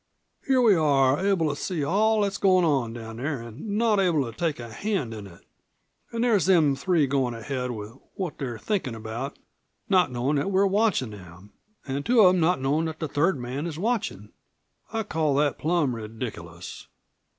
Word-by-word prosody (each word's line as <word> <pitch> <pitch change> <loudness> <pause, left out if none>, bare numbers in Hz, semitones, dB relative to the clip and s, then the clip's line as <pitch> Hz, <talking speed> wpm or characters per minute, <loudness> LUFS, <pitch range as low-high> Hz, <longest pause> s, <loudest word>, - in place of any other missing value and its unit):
Here 265 -1 +4
we 220 -4 +6
are, 145 -2 +3
able 195 -5 +2
to 145 - -2
see 165 0 -3
all 215 +7 +2
that's 200 -1 -1
goin' 185 -3 +4
on 135 -7 +1
down 110 -1 -8
there 140 +2 -2
an' 150 - -5
not 220 -2 +3
able 170 -7 +2
to 115 -2 -8
take 165 -5 -1
a 120 -2 -8
hand 190 - -2
in 105 -2 -8
it. 85 - -17 0.7
An' 230 - -2
there's 215 -8 +3
them 160 -7 +4
three 155 +2 +2
goin' 130 -3 0
ahead 125 +2 -4
with 105 -3 -6 0.2
what 185 -5 -4
they're 125 -4 -4
thinkin' 165 - -2
about, 115 +5 -6 0.5
not 180 -8 +4
knowin' 125 +4 0
that 160 +8 0
we're 195 0 +3
watchin' 195 - +1
them, 95 0 -13 0.3
an' 140 +1 -2
two 235 - +4
of 185 -2 +7
them 185 - +1
not 170 0 +2
knowin' 145 +5 +1
that 160 -1 -4
the 160 - -3
third 150 +4 +1
man 130 +6 -4
is 160 -3 -6
watchin'. 220 +3 -2 0.6
I'd 220 -2 -3
call 155 -3 +1
that 145 0 +1
plum 155 -6 +1
re 110 -2 -6
diculous." 90 -7 -8
150 Hz, 195 wpm, -26 LUFS, 125-190 Hz, 0.7 s, of